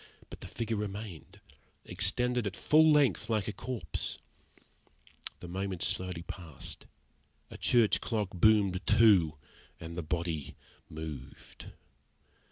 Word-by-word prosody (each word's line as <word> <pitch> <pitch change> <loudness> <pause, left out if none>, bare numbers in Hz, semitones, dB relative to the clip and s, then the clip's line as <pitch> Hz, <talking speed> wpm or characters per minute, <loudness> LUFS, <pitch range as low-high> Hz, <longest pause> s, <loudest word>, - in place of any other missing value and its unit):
But - - -10
the - - -7
figure 115 -1 -3
remained 100 -5 -6 0.5
extended 125 +3 +1
at 100 - -5
full 155 +1 +5
length 130 - +3
like 110 -4 0
a 105 - -2
corpse. 125 -1 -3 1.2
The - - -7
minutes 95 0 -3
slowly 90 -2 -2
passed, 85 -5 -9 0.6
a - - -8
church 115 -3 +3
clock 105 -5 -1
boomed 100 -1 +3
two, 95 -9 +5 0.4
and 85 0 -8
the 85 - -2
body 80 -3 -3 0.3
moved. 75 -4 -9
100 Hz, 115 wpm, -31 LUFS, 85-110 Hz, 1.2 s, full